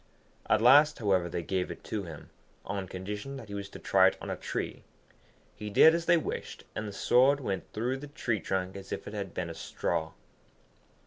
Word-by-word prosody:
At 110 - +3
last, 145 +4 +7
however, 95 -5 +1
they 85 0 -3
gave 95 +1 -1
it - - -8
to 105 -3 -4
him, 80 -3 -10 0.3
on 100 -2 -3
condition 105 +9 -6
that 115 -6 -10
he - - -7
was 100 0 -5
to - - -10
try 95 -1 +4
it 95 - 0
on - - -5
a - - -1
tree. - - -4 0.7
He 105 - -6
did 160 +10 +7
as 170 0 -1
they 170 0 +6
wished, 160 - -5
and 110 - -3
the - - -5
sword 130 +7 +4
went 100 -9 -4
through 120 +5 -1
the 145 +2 -8
tree 120 -5 -2
trunk 95 0 -2
as 100 -1 -9
if - - -4
it 105 - -7
had 100 -3 -5
been 85 -2 -3
a - - -6
straw. 80 0 -2
105 Hz, 210 wpm, -30 LUFS, 95-125 Hz, 0.7 s, last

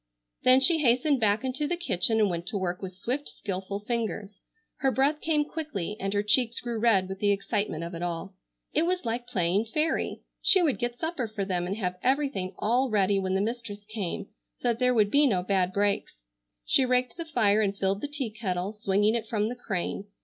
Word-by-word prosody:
Then 255 +1 +6
she 325 +4 +7
hastened 265 +1 +3
back 215 +1 +2
into 265 +3 -1
the 350 - -1
kitchen 225 - +2
and 210 - +4
went 170 -1 -4
to 205 - -1
work 180 -2 -3
with 185 -2 -7
swift 255 +9 -3
skilful 195 0 -5
fingers. 215 -3 -3 0.4
Her 270 - +2
breath 280 +4 +1
came 305 -2 +1
quickly 290 - -4
and 195 0 -2
her 205 0 0
cheeks 235 +2 +3
grew 235 -2 -4
red 210 -5 +3
with 190 0 -6
the 205 - +2
excitement 200 -4 -1
of 170 +1 -6
it 170 - -6
all. 175 +2 -4 0.4
It 320 +3 +2
was 365 -3 -1
like 235 +1 -3
playing 190 -1 +1
fairy. 305 +8 -1 0.2
She 375 -2 +5
would 295 -6 +1
get 240 0 -2
supper 320 -5 -3
for 210 -2 -4
them 180 -2 -1
and 195 - -2
have 180 -4 -3
everything 260 -9 0
all 245 +5 +1
ready 200 -2 +2
when 190 0 -1
the 190 - +1
mistress 215 -2 -4
came, 200 -2 -3 0.3
so 245 - -1
that 235 -1 -1
there 250 -1 +3
would 210 -2 +3
be 290 0 +5
no 185 -7 +1
bad 185 -1 +1
breaks. 200 +1 0 0.5
She - - +4
raked 250 -1 +1
the 335 - -5
fire 215 -9 +3
and 200 -1 -1
filled 195 +1 0
the - - -2
tea 280 -6 -3
kettle, 195 -3 -3
swinging 210 0 +1
it 230 -1 -2
from 215 -1 0
the 245 - -5
crane. 195 -4 -3
215 Hz, 215 wpm, -27 LUFS, 195-255 Hz, 0.5 s, she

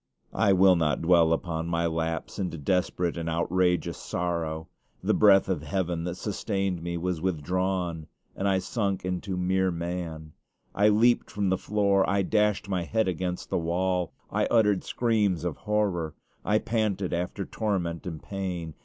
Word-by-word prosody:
I 100 - +3
will 95 0 +6
not 80 -2 0
dwell 85 -1 +5
upon 80 0 -1
my 85 0 0
lapse 80 +1 -2
into 90 -4 -2
desperate 90 +2 0
and 85 0 -3
outrageous 90 +2 +1
sorrow. 85 -2 -3 0.4
The - - +2
breath 100 -2 +6
of 90 -6 -1
heaven 85 +1 -2
that 90 -1 -3
sustained 95 -3 -2
me 85 0 -3
was 90 -1 -2
withdrawn, 90 -1 -1 0.3
and 100 - -1
I 95 -1 +3
sunk 100 0 -2
into 90 +1 -3
mere 95 +1 +1
man. 85 -3 -5 0.4
I 105 +1 +4
leaped 115 +3 +3
from 100 -2 -1
the 95 - +3
floor; 100 -2 +2
I 100 0 +2
dashed 105 -1 +1
my 95 -2 -1
head 110 +5 0
against 90 0 -3
the - - +1
wall; 90 +1 0 0.2
I - - +1
uttered 105 -5 +3
screams 105 -8 +1
of 85 -4 -2
horror; 100 -7 -1 0.3
I 105 - +2
panted 105 -5 -1
after 90 +3 -2
torment 90 -6 -2
and 80 -3 -6
pain. 90 -5 -4
90 Hz, 160 wpm, -27 LUFS, 85-100 Hz, 0.4 s, will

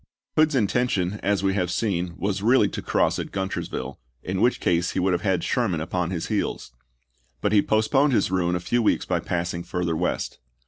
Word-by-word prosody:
Hood's 155 -1 +3
intention, 105 -4 +1
as 100 -1 0
we 95 0 +2
have 90 -3 0
seen, 90 -4 -1
was 100 0 -1
really 115 0 +4
to - - -5
cross - - +1
at - - -4
Guntersville, 95 -8 -4 0.2
in 95 +1 -2
which 125 - +3
case 85 0 +1
he - - 0
would 95 0 +2
have 90 - 0
had 95 -4 0
Sherman 105 -10 0
upon 90 +1 -2
his 85 -3 -3
heels; - - -2 0.7
but 105 - 0
he 105 -1 +5
postponed 135 +8 +2
his 100 -5 +2
ruin 90 -1 +1
a - - 0
few 120 +7 0
weeks 110 - +1
by - - 0
passing 85 0 -2
further 85 -1 -2
west. 90 +3 -2
95 Hz, 195 wpm, -24 LUFS, 90-105 Hz, 0.7 s, he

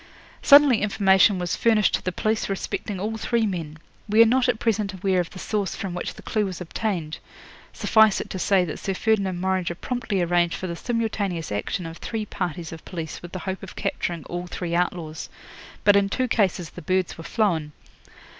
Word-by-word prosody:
'Suddenly 285 -5 +7
information 195 -1 +4
was 180 -1 -1
furnished 220 -3 +3
to - - +1
the 185 - -1
police 215 +4 -1
respecting 195 0 -3
all 220 +3 -2
three 230 +1 +1
men. 165 -6 -4 0.3
We 220 +2 +7
are - - +4
not 250 +2 +3
at 245 - +1
present 210 -3 0
aware 185 0 +1
of 175 - -1
the - - -12
source 200 0 -2
from 190 -3 -4
which 180 - -4
the - - -13
clue 215 - 0
was 185 -3 -5
obtained. 180 -3 -3 0.5
Suffice 220 -2 +4
it - - -5
to 190 - -4
say 190 -1 +3
that 155 - -6
Sir 195 - -2
Ferdinand 195 -4 +1
Morringer 185 -2 0
promptly 225 -1 -2
arranged 175 0 +2
for - - -5
the 170 -2 -4
simultaneous 205 - -2
action 105 - -2
of 165 0 -7
three 220 -2 -4
parties 175 -4 -4
of 165 -1 -9
police 165 -4 -6
with 175 - -10
the 185 - -5
hope 190 0 -3
of 195 - -10
capturing 170 -3 -3
all 175 +1 -5
three 175 -1 -4
outlaws. 170 -2 -2 0.5
But 205 - +6
in 200 0 +3
two 255 +5 0
cases 185 -8 0
the 180 - -9
birds 185 +2 0
were 165 - -9
flown. 165 -8 0
190 Hz, 200 wpm, -24 LUFS, 175-215 Hz, 0.5 s, Suddenly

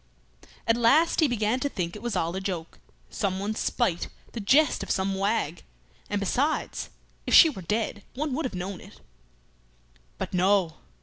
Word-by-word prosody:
At 230 0 +3
last 285 +8 +4
he 315 - +5
began 230 0 0
to 285 - -1
think 175 -7 -4
it 210 - -8
was 235 -3 -3
all 170 0 -1
a 190 - -3
joke; 180 -4 -5 0.3
someone's 200 +2 -2
spite, 185 -9 0 0.2
the 235 - -6
jest 275 +9 +3
of - - -6
some 190 0 0
wag; 195 -4 -1 0.5
and 205 - 0
besides, 260 - -1 0.4
if - - +4
she 325 - +9
were 190 - -8
dead, 210 +3 -2
one 290 +1 -2
would 310 +3 -2
have 245 - -4
known 180 +1 -5
it. - - -15 1.2
But - - -5
no! 185 -3 +2
205 Hz, 170 wpm, -27 LUFS, 185-245 Hz, 1.2 s, she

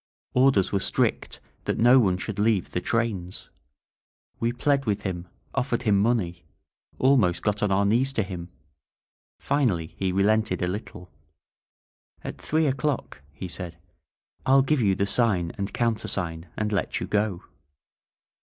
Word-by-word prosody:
Or 130 +2 +5
ders 95 -7 +1
were 100 - +1
strict - - 0 0.3
that - - -1
no 120 +3 +6
one 95 -6 +2
should 100 +2 -5
leave 105 -3 +1
the 90 - -2
trains. 105 -6 -2 0.9
We 115 +1 +1
pled 140 +3 +1
with 105 -3 -1
him, 90 -2 -4 0.3
offered 125 -2 -1
him 105 -4 +3
money, 95 -7 0 0.5
almost 120 -10 +3
got 105 -1 0
on 105 - +1
our 100 +1 +3
knees 120 +6 +2
to 110 - +1
him. 90 -3 -7 0.9
Finally 115 - 0
he 95 -1 -1
relented 100 -1 +2
a - - +1
little. 90 -2 -6 1.1
"At - - -7
three 160 +1 +1
o'clock," 135 - -2
he 75 +6 -7
said, 90 -1 -7 0.7
"I'll 135 0 +5
give 140 0 +1
you 100 -3 +3
the 100 - +1
sign 100 -6 +1
and 100 0 -4
countersign 95 -8 -2
and 110 -1 -1
let 100 -4 -1
you - - -3
go." 105 -4 -1
105 Hz, 150 wpm, -26 LUFS, 90-120 Hz, 1.1 s, no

